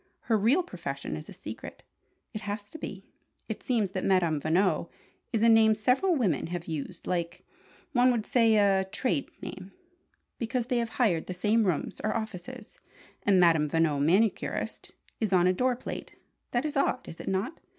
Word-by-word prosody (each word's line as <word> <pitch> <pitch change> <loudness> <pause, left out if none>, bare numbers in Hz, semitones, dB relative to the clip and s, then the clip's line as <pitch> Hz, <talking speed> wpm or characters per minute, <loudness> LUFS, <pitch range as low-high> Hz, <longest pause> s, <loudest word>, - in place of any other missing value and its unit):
Her 230 - +1
real 235 - +3
profession 140 - -5
is 75 - -8
a - - -8
secret. - - -9 0.5
It 215 - -5
has 205 0 -5
to 320 - -9
be! - - -7 0.4
It - - -5
seems 225 -7 0
that 190 -1 -3
'Madame 170 -6 +2
Veno' 180 +6 +1 0.4
is 225 -2 +1
a - - +6
name 220 -1 +6
several 260 - +2
women 190 - +1
have 175 0 -4
used, 165 +2 -5
like 170 -2 -3 0.5
one 250 -3 +4
would 230 -3 -1
say, 230 -4 +4
a 195 -2 +4
'trade 255 +8 -1
name,' 190 +1 -8 0.7
because 235 +1 -1
they 250 -1 0
have 230 -1 -4
hired 190 -10 +2
the 185 - -4
same 215 +4 +2
rooms, 180 -6 -1
or 215 - 0
offices, 220 +2 -7 0.4
and 195 -2 +4
'Madame 165 -4 +4
Veno, 160 -2 +2
Manicurist' 190 +8 0 0.3
is 220 -3 0
on 180 -2 +4
a 185 - +4
doorplate. 250 +5 -2 0.3
That 240 +4 0
is 305 0 -3
odd, 275 -2 0
is 165 - -9
it - - -8
not? 195 +11 -2
205 Hz, 175 wpm, -28 LUFS, 175-235 Hz, 0.7 s, a